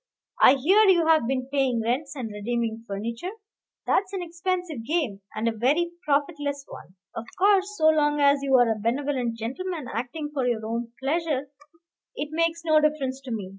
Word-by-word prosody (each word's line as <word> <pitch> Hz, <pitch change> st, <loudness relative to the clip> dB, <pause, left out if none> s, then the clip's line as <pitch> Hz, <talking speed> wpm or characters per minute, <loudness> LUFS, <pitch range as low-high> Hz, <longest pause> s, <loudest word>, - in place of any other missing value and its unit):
I 270 Hz, -, +8 dB
hear 380 Hz, +11 st, +4 dB
you 345 Hz, -3 st, +4 dB
have 315 Hz, -7 st, +4 dB
been 255 Hz, 0 st, -1 dB
paying 265 Hz, -4 st, +1 dB
rents 255 Hz, +6 st, -2 dB
and 240 Hz, -5 st, -5 dB
redeeming 225 Hz, +1 st, -3 dB
furniture, 230 Hz, -, -4 dB, 0.5 s
that's 390 Hz, -1 st, +1 dB
an 375 Hz, -2 st, -3 dB
expensive 345 Hz, -, -3 dB
game, 275 Hz, -, -1 dB
and 215 Hz, +2 st, -1 dB
a -, -, +3 dB
very 280 Hz, +10 st, +1 dB
profitless 285 Hz, -1 st, -1 dB
one. 185 Hz, -, -12 dB, 0.2 s
Of -, -, -5 dB
course, 400 Hz, +1 st, +3 dB
so 315 Hz, -2 st, +5 dB
long 295 Hz, -1 st, +2 dB
as 280 Hz, 0 st, +4 dB
you 275 Hz, -1 st, +2 dB
are 245 Hz, -2 st, +5 dB
a 220 Hz, -, -2 dB
benevolent 245 Hz, 0 st, -1 dB
gentleman 305 Hz, +7 st, -4 dB
acting 295 Hz, +6 st, -4 dB
for 265 Hz, -4 st, 0 dB
your 225 Hz, -3 st, -1 dB
own 230 Hz, +1 st, -3 dB
pleasure, 285 Hz, -1 st, -1 dB, 0.6 s
it 290 Hz, -, -4 dB
makes 330 Hz, +1 st, 0 dB
no 310 Hz, -1 st, +4 dB
difference 275 Hz, -3 st, 0 dB
to 255 Hz, -, -6 dB
me. 205 Hz, -5 st, -4 dB
280 Hz, 175 wpm, -25 LUFS, 235-320 Hz, 0.6 s, I